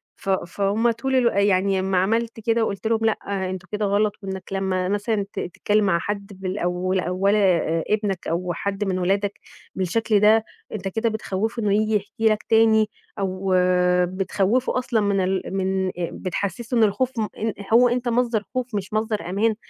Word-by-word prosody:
ف - - -7
فهُم 200 +5 +1
طول 265 +4 -2
الو 250 -2 +4
يعني 195 -1 +2
امّا 190 0 0
عملت 225 +5 0
كده 225 +1 +1
وقُلت 200 +2 -3
لهم 225 0 +2
لأ 200 -3 -1
أنتم 185 -1 -6
كده 210 0 -1
غلط 205 +1 +2
إنك 190 -1 -5
لمّا 190 -1 -1
مثلًا 205 0 0
ت - - -4
تتكلم 205 +4 0
مع 170 -3 +2
حد 200 +2 -4
بالاو 185 -1 -1
أولي 195 +4 +1 0.5
ابنك 205 -3 -1
أو 175 +2 -1
حد 200 +3 -3
من 185 -1 -1
ولادك 195 +2 0 0.4
بالشكل 210 +3 +1
ده، 215 +2 +5 0.3
أنت 195 -3 -4
كده 225 +4 0
بتخوفه 220 +1 -3
إنه 205 -1 +2
ييجي 215 +1 +2
يحكي 210 +2 -3
لك 215 -1 +1
تاني 220 -1 +4 0.3
أو 190 0 -1 0.5
بتخوفه 195 +7 0
أصلًا 245 -3 0
من 200 -1 +1
ال 185 0 0
من 190 -1 0 0.2
بتحسسه 200 +6 -3
إن 230 - +5
الخوف 220 +5 +1
م 215 - 0
إن 220 0 -1 0.2
هو 245 +2 +6
أنت 245 0 -1
مصدر 235 -2 +1
خوف 250 -3 -2
مش 200 0 -4
مصدر 215 -5 -1
أمان، 215 +4 +1
205 Hz, 170 wpm, -23 LUFS, 190-220 Hz, 0.5 s, هو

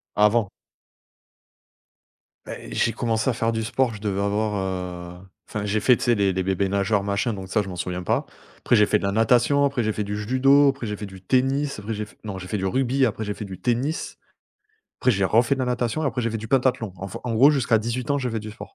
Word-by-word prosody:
Avant. 105 0 +3 2.0
Beh, - - -8
j'ai 115 - +1
commencé 115 +1 0
à - - +1
faire 115 0 0
du 110 -1 -2
sport, 120 +1 0
je 105 - -9
devais 100 -2 -2
avoir, 105 +1 0
heu 90 -2 -4 0.3
enfin, 105 -1 -4
j'ai 105 +1 0
fait, 120 +5 +5
tu 125 - -5
sais, 120 -1 +4
les 100 -2 +2
les 95 - -1
bébés 95 +1 0
nageurs 100 +1 +1
machin 100 +3 -1
donc 95 -2 -7
ça, 105 - +2
je 95 - -6
m'en 90 - -6
souviens 90 0 -3
pas. 115 +10 0 0.3
Après 120 - +2
j'ai 105 -1 +5
fait 105 - +3
de - - -7
la 100 - 0
natation, 120 +6 +3
après 140 -4 +1
j'ai 110 -1 0
fait 105 - -2
du 105 +1 -4
judo, 135 +6 +4
après 135 -4 -3
j'ai 105 - -3
fait 105 +1 -7
du 95 -1 -11
tennis, 135 +6 +1
après 105 +2 -5
j'ai 105 0 -4
fait 105 - -20
non, 100 -3 -5
j'ai 90 - -8
fait 105 - -2
du 95 - -2
rugby, 130 +5 +1
après 110 -1 -2
j'ai 105 - -3
fait 105 - -6
du 95 -2 -9
tennis. 130 +6 -1 0.8
Après, 130 - +3
j'ai 100 -3 +1
refait 115 +7 +3
de - - -8
la 125 - 0
natation 125 +4 -1
et - - +1
après, 125 -3 -1
j'ai 115 - 0
fait 115 - -3
du 110 +1 -8
pentathlon. 125 -5 +1
Enfin, 95 +1 -7
en 115 -2 -2
gros 135 +6 +7
jusqu'à 125 -5 +2
18 120 +3 -3
ans, 140 - +3
j'ai 130 -3 -2
fait 110 - -2
du 110 0 -7
sport. 105 -1 -11
110 Hz, 255 wpm, -24 LUFS, 100-125 Hz, 2.0 s, gros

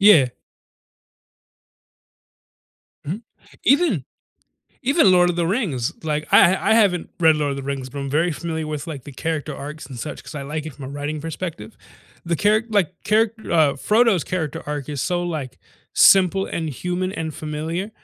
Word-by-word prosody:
Yeah. 190 -11 +7 2.8
Mhm. 195 +9 -3 0.4
Even 300 +7 +3 0.8
even 270 - +4
Lord 175 -1 +5
of 175 - -1
the 170 -1 +1
Rings, 170 - -1
like, 150 -1 -2
I 175 - +7
h 190 - 0
I 220 - +2
haven't 195 -6 +2
read 160 -2 +5
Lord 150 -1 0
of 140 - -3
the 140 - -5
Rings, 135 -1 -4
but 140 - -7
I'm 140 - -3
very 160 +5 +1
familiar 160 0 -4
with, 150 +1 -4
like, 145 -6 -7
the 145 - -9
character 155 +1 -3
arcs 150 +3 -7
and 130 -4 -9
such 125 - -6
'cause 135 - -10
I 145 - -4
like 150 +2 -4
it 155 - -6
from 135 0 -9
a - - -6
writing 145 +2 -4
perspective. 160 -9 -6 0.5
The 170 0 0
charac 215 +6 +2
like, 185 -5 +1
charac 220 +1 +3 0.2
uh, 155 -4 +4
Frodo's 210 - +3
character 160 -6 -3
arc 145 -1 -4
is 145 -3 -3
so, 175 -1 0
like, 150 -7 -4 0.3
simple 195 0 +5
and 160 -2 -3
human 180 +6 -3
and 160 -4 -4
familiar. 160 +6 -4
160 Hz, 175 wpm, -22 LUFS, 145-185 Hz, 2.8 s, Yeah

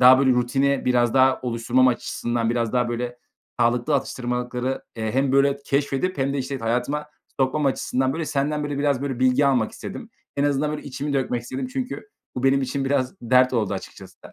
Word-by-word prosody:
daha, 130 +1 +8
böyle, 135 -1 +4
rutini 135 +3 +1
biraz 120 -1 +2
daha 130 0 +4
oluşturmam 125 +1 +2
açısından 120 -1 -1
biraz 115 -2 -1
daha, 125 -1 +1
böyle, 120 +1 -3 0.4
sağlıklı 120 +5 +2
atıştırmalıkları, 125 0 -2
eee, 110 -1 -2
hem 135 0 +1
böyle 140 0 +4
keşfedip 140 +6 0
hem 135 +1 +1
de, - - -1
işte 135 +1 -3
t 115 - -8
hayatıma 125 +6 -1 0.3
sokmam 140 +2 +1
açısından, 130 0 0
böyle, 160 +1 -3
senden, 150 +1 -1
böyle, 145 -1 -3
biraz, 140 -2 +1
böyle, 135 -3 -3
bilgi 130 +2 +4
almak 125 -5 +2
istedim. - - -8 0.3
En 140 - +1
azından, 145 +1 +1
böyle, 150 - -4
içimi 145 +1 -4
dökmek 125 -3 -1
istedim 130 - -4
çünkü 260 +9 -5 0.3
bu 125 - -3
benim 135 0 +4
için 135 +1 -2
biraz 130 -2 0
dert 125 +2 +4
oldu 105 -5 0
açıkçası. 95 - -10
130 Hz, 190 wpm, -23 LUFS, 125-140 Hz, 0.4 s, daha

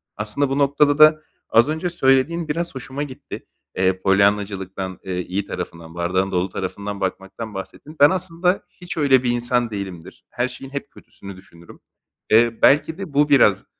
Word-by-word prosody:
Aslında 110 +7 -2
bu 135 - -1
noktada 145 +1 +2
da 155 0 +7 0.3
az 120 +5 +4
önce 160 +3 -2
söylediğin 160 +2 +1
biraz 165 +1 -3
hoşuma 130 +2 -5
gitti. 130 -3 -9 0.3
Eee, 95 0 +1
Polyanna'cılıktan, 95 -1 0
eee, 90 -1 -4
iyi 95 +3 -3
tarafından, 85 -3 -7
bardağın 95 +3 -1
dolu 90 +1 0
tarafından 100 +2 -5
bakmaktan 95 +3 -5
bahsettin. 95 +11 -9
Ben 145 - +8
aslında 180 +1 -1
hiç 180 0 -9
öyle 135 -4 +4
bir 120 - +1
insan 120 0 0
değilimdir. 95 -5 -8
Her 125 +1 -1
şeyin 135 +1 -11
hep 140 - -6
kötüsünü 100 -1 -13
düşünürüm. 85 -2 -16 0.5
Eee, 115 +1 +4
belki 155 +3 +4
de 190 -6 -7
bu 145 +1 +3
biraz, 140 -3 +4
120 Hz, 160 wpm, -21 LUFS, 95-145 Hz, 0.5 s, Ben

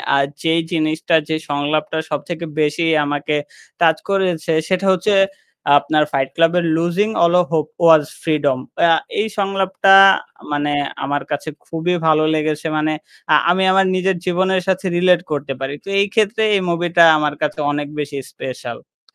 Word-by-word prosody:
আ - - +3 0.3
যেই 165 0 +2
জিনিসটা, 160 +1 0
যে 160 - 0
সংলাপটা 145 +2 -1
সবথেকে 160 +3 -4 0.2
বেশি 150 +3 0 0.2
আমাকে 145 +1 -2 0.5
টাচ 160 -1 +4
করেছে। 180 -4 0 0.2
সেটা 190 +1 0
হচ্ছে 195 +3 0 0.6
আপনার 150 +1 +1
ফাইট 135 -1 0
ক্লাব 165 +1 +3
এর 170 - -2
লুজিং 175 +6 0
অল 170 +1 +3
ওফ 175 - -4
হোপ 155 -2 +1 0.2
ওয়াজ 160 -2 +6 0.2
ফ্রিডম। 145 -5 0 0.3
আ - - +4 0.3
এই 220 - -2
সংলাপটা 195 -1 +2 0.6
মানে 145 0 -1 0.3
আমার 145 0 -2
কাছে 145 +2 -3 0.2
খুবই 165 +2 -2
ভালো 155 -1 +3
লেগেছে। 155 0 -2
মানে 155 0 0 0.4
আ - - +7 0.2
আমি 190 +2 +1
আমার 195 0 +3
নিজের 185 0 0
জীবনের 185 +1 +1
সাথে 190 +1 -1
রিলেট 180 -1 +3
করতে 140 -2 -3
পারি। 135 +2 -4
তো - - -8
এই 200 - +3
ক্ষেত্রে 220 +1 +1
এই 195 - +1
মুভিটা 170 0 +2
আমার 150 -1 -1
কাছে 150 0 -2
অনেক 145 0 -3
বেশি 145 -1 -4 0.2
স্পেশাল। 125 -2 -9
165 Hz, 160 wpm, -18 LUFS, 150-185 Hz, 0.6 s, আ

